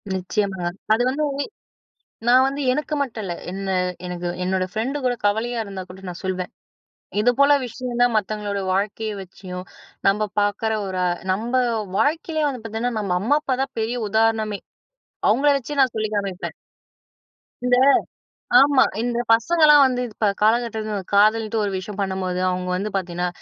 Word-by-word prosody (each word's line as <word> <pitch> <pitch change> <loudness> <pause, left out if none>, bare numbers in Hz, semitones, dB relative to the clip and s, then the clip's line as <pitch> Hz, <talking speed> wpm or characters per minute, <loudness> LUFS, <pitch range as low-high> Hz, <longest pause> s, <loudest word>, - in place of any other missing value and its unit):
நிச்சயமா. 190 0 -2 0.3
அது 225 - +2
வந்து, 295 +4 -1 1.0
நான் 255 +2 +6
வந்து 275 +1 -3
எனக்கு 300 +3 -2
மட்டும் 230 -6 -3
இல்ல, 175 - -3 0.2
என்ன 195 +1 -5 0.4
எனக்கு 180 0 -4 0.2
என்னோட 185 0 0
ஃப்ரெண்டு 240 +6 -2
கூட 245 - +2
கவலையா 225 +3 0
இருந்தா 195 -2 -6
கூட 190 +1 -11
நான் 175 - -8
சொல்வேன். 185 +1 -3 0.7
"இது 245 +3 +4
போல 280 +1 +6
விஷயம் 245 0 -5
தான்" 245 -2 +3
மத்தவங்களோட 205 -1 -2
வாழ்க்கைய 215 +3 -1
வச்சியும், 185 -1 -8 0.4
நம்ப 210 +1 +2
பாக்குற 205 +2 0
ஒரு, 185 -1 -3
அ - - +2 0.2
நம்ப 230 +6 -4 0.4
வாழ்க்கையிலயே 310 +2 +1
வந்து 250 -5 -6
பாத்தீங்கன்னா, 225 +2 -2
நம்ம 190 -3 -1
அம்மா 270 +8 +3
அப்பா 265 -3 -1
தான் 270 - -8
பெரிய 225 +3 -1
உதாரணமே! 220 -2 +1 0.7
அவுங்கள 270 +8 +4
வச்சே 285 +2 -6
நான் 260 -3 +3
சொல்லி 215 0 0
காமிப்பேன். 185 -4 -3 1.1
இந்த 250 0 +4 0.9
ஆமா, 275 -1 +5 0.2
இந்த 240 0 -1
பசங்கள்லாம் 300 +5 +6
வந்து 255 -1 +1
இப்போ 215 0 -2
காலகட்டத்தில, 220 -1 +1 0.2
காதல்ன்ட்டு 215 +2 +3
ஒரு 200 - -1
விஷயம் 190 +2 -6
பண்ணும்போது, 190 -2 -2
அவுங்க 180 0 -2
வந்து 200 +4 -2
பாத்தீங்கன்னா, 180 -1 -2
215 Hz, 150 wpm, -22 LUFS, 195-245 Hz, 1.1 s, நான்